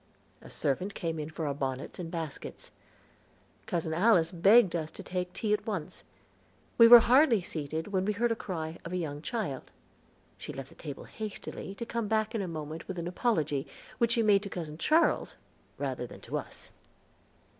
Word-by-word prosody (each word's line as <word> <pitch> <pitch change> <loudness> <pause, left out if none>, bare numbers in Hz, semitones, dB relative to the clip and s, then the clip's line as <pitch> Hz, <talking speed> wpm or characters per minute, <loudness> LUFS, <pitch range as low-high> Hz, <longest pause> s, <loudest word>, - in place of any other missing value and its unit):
A - - -12
servant 180 +9 -1
came 165 -2 -3
in 150 0 -4
for 160 0 -4
our 145 - 0
bonnets 135 +1 -4
and 170 -2 -4
baskets. 165 -4 -6 1.0
Cousin 165 -2 -1
Alice 175 -2 +4
begged 195 +2 +5
us 160 -2 -2
to - - -10
take 180 0 -3
tea 210 +3 -1
at 210 - -1
once. 190 -8 -4 0.8
We 230 - +10
were 240 0 +11
hardly 250 -1 +5
seated 160 -1 -4
when 190 -2 0
we 210 - +1
heard 235 +3 +1
the - - +2
cry 165 -6 -5
of 170 - -6
a - - 0
young 150 -4 -4
child; 170 - -4 0.7
she - - -6
left 135 -1 -7
the - - -16
table 145 -4 -8
hastily, 210 -2 -7
to 235 - -5
come 230 -1 -2
back 215 0 0
in 225 - -1
a 190 - -3
moment 155 -1 -6
with 190 - -5
an 170 0 -3
apology, 155 - 0 0.3
which 235 0 +3
she 235 -2 +2
made 205 -2 +5
to 200 - -6
Cousin 160 -4 -6
Charles 320 - +2 0.4
rather - - -3
than - - -12
to - - -3
us. - - -9
180 Hz, 190 wpm, -30 LUFS, 160-215 Hz, 1.0 s, were